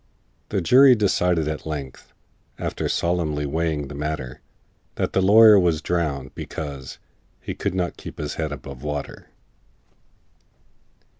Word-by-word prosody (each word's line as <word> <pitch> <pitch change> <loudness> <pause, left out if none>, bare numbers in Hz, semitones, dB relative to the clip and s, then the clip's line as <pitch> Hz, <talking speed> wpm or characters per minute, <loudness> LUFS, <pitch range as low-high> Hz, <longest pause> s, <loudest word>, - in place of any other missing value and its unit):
The 100 - -1
jury 130 +8 +7
decided 90 -6 +1
at 75 0 -4
length, 70 -4 -7 0.5
After - - -3
solemnly 80 -4 -1
weighing 75 -1 -1
the 75 - -9
matter, 75 -4 -5 0.5
That - - -2
the 95 - +2
lawyer 105 +2 +8
was 85 -4 +2
drownded, 75 -6 -2
because 70 -4 -7 0.4
He - - -6
could - - -3
not 90 -2 -2
keep - - -10
his 75 -1 -4
head 80 -2 -3
above 70 -2 -8
water! 75 -1 -6
80 Hz, 130 wpm, -23 LUFS, 75-90 Hz, 0.5 s, lawyer